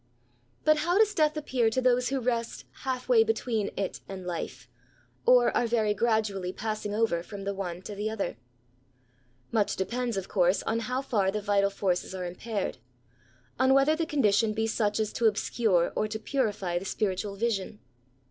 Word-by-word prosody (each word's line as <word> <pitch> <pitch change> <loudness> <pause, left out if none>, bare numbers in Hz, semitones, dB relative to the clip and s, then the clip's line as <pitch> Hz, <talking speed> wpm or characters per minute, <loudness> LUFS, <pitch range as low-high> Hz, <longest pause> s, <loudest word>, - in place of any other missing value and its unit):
But 310 0 +5
how 345 +5 +1
does 425 -1 +4
death 305 -1 +2
appear 255 -6 +1
to 225 - 0
those 250 -1 +2
who 270 0 0
rest 235 -2 -2 0.2
half 255 -1 -2
way 235 -3 +6
between 225 -1 -1
it 195 -2 -2
and 190 -2 -7
life, 175 -2 -5 0.6
or - - +5
are 240 - +2
very 220 -3 +2
gradually 210 -4 0
passing 215 0 -4
over 215 -6 +1
from 200 +3 -8
the 200 0 -2
one 180 -2 -5
to 210 - -6
the 210 +2 -2
other? 220 - -3 1.1
Much 215 -3 +1
depends, 235 +3 -2
of 195 - -3
course, 180 -1 +2
on 225 +1 0
how 250 +4 -2
far 205 -8 +1
the 210 +2 -1
vital 200 -1 +2
forces 190 -1 -1
are 180 -1 -4
impaired— 195 - -4 0.8
on 260 +1 +5
whether 275 +3 +4
the 325 0 -2
condition 220 -6 +2
be 220 +1 0
such 215 -1 0
as 215 -1 -1
to 230 - +3
obscure 205 -4 +1
or 215 - +1
to 215 +1 -4
purify 210 -7 -1
the 190 - -9
spiritual 195 0 -2
vision. 210 -2 -2
220 Hz, 175 wpm, -28 LUFS, 195-245 Hz, 1.1 s, way